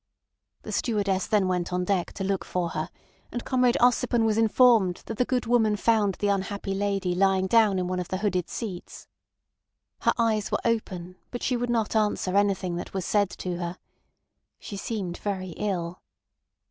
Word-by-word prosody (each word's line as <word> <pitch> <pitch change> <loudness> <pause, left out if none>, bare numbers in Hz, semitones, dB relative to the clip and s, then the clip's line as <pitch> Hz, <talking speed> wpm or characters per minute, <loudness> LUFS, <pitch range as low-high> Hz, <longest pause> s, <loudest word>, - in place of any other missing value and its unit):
The - - -6
stewardess 200 -5 0
then 205 -3 +2
went 180 -1 -1
on 180 0 0
deck 185 -2 0
to 195 - -4
look 195 0 -1
for 180 -2 -2
her, 155 +1 -3 0.4
and 240 - -5
Comrade 250 -2 +3
Ossipon 240 -1 +3
was 220 -1 +2
informed 225 -4 +4
that 225 - -6
the 250 - +3
good 250 -1 0
woman 225 -3 +3
found 210 -2 +2
the 205 - -1
unhappy 200 0 -1
lady 195 -2 0
lying 190 +1 +3
down 210 -1 +4
in 180 - 0
one 185 0 -2
of 180 - -3
the 185 - -2
hooded 185 -3 -1
seats. 190 -6 -6 0.9
Her - - +2
eyes 220 -3 +1
were - - +2
open, 185 -6 -2
but 245 - -6
she 250 - +1
would 245 0 -2
not 230 -2 0
answer 210 -3 +1
anything 195 -3 +1
that 175 - -7
was 190 -2 -2
said 205 -2 +2
to 180 -1 -4
her. 175 +1 -4 0.8
She 205 - -8
seemed 195 -4 -4
very 190 -3 -3
ill. 175 -2 -3
200 Hz, 180 wpm, -26 LUFS, 185-225 Hz, 0.9 s, informed